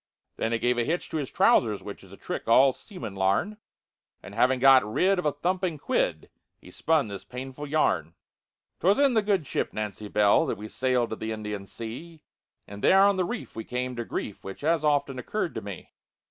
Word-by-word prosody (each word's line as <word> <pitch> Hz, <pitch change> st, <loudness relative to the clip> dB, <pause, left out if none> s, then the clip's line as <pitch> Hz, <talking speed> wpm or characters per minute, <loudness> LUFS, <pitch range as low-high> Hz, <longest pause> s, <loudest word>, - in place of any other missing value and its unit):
Then 115 Hz, -, -1 dB
he 115 Hz, -, +1 dB
gave 120 Hz, +1 st, +1 dB
a -, -, +2 dB
hitch 165 Hz, +7 st, -2 dB
to -, -, -3 dB
his 140 Hz, -4 st, -3 dB
trousers, 110 Hz, -5 st, +3 dB
which -, -, -9 dB
Is -, -, -16 dB
a -, -, -12 dB
trick -, -, -5 dB
all 130 Hz, +4 st, +6 dB
seamen 180 Hz, -, -9 dB
larn, 100 Hz, -, 0 dB, 0.7 s
And 100 Hz, -, -10 dB
having 125 Hz, +4 st, +2 dB
got 135 Hz, 0 st, +7 dB
rid 180 Hz, -, +1 dB
of 180 Hz, -, 0 dB
a -, -, +2 dB
thumping 175 Hz, +2 st, -1 dB
quid, -, -, -1 dB, 0.3 s
He 90 Hz, -, -15 dB
spun 155 Hz, -, +1 dB
this 100 Hz, -2 st, -7 dB
painful 130 Hz, +6 st, -7 dB
yarn: 140 Hz, -, 0 dB, 0.6 s
"'Twas 195 Hz, +4 st, +3 dB
in 280 Hz, -2 st, +4 dB
the 220 Hz, -, +3 dB
good 200 Hz, -6 st, 0 dB
ship -, -, -2 dB
Nancy 105 Hz, 0 st, -5 dB
Bell 105 Hz, 0 st, +3 dB
That -, -, -2 dB
we 105 Hz, +1 st, -8 dB
sailed 125 Hz, -2 st, 0 dB
to -, -, -2 dB
the 110 Hz, 0 st, -4 dB
Indian 105 Hz, -2 st, -5 dB
Sea, 150 Hz, +11 st, -8 dB, 0.4 s
And 100 Hz, 0 st, -10 dB
there 195 Hz, +1 st, +6 dB
on 200 Hz, -1 st, +3 dB
a -, -, +3 dB
reef 220 Hz, +6 st, -5 dB
we 115 Hz, -, -5 dB
come 125 Hz, +2 st, -3 dB
to 120 Hz, -, -3 dB
grief, 105 Hz, -2 st, -5 dB
Which 95 Hz, 0 st, -8 dB
has 160 Hz, +1 st, +1 dB
often 145 Hz, -3 st, +1 dB
occurred 175 Hz, -, -3 dB
to 110 Hz, -, -5 dB
me. 100 Hz, -4 st, -9 dB
130 Hz, 210 wpm, -27 LUFS, 110-165 Hz, 0.7 s, got